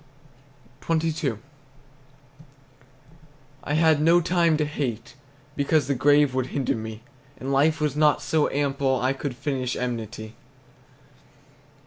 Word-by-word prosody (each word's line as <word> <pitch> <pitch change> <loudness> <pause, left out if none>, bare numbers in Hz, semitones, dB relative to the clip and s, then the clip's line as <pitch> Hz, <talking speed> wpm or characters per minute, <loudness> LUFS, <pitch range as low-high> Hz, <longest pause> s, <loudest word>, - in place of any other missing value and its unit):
XXII. 160 -4 0 2.3
I 145 - -2
had 160 -1 +3
no 165 +3 +5
time 170 -2 +2
to 150 - 0
hate, 130 -6 -4 0.4
because 145 0 +1
The 140 - 0
grave 145 +1 +3
would 130 -1 -1
hinder 135 -2 -1
me, 110 0 -7 0.3
And 135 +2 -4
life 155 +4 +3
was 150 -1 -1
not 150 -1 +3
so 155 -2 +1
ample 140 -2 0
I 130 +2 +1
Could 135 -1 -5
finish 130 -2 -3
enmity. 115 -3 -5
140 Hz, 115 wpm, -24 LUFS, 130-155 Hz, 2.3 s, no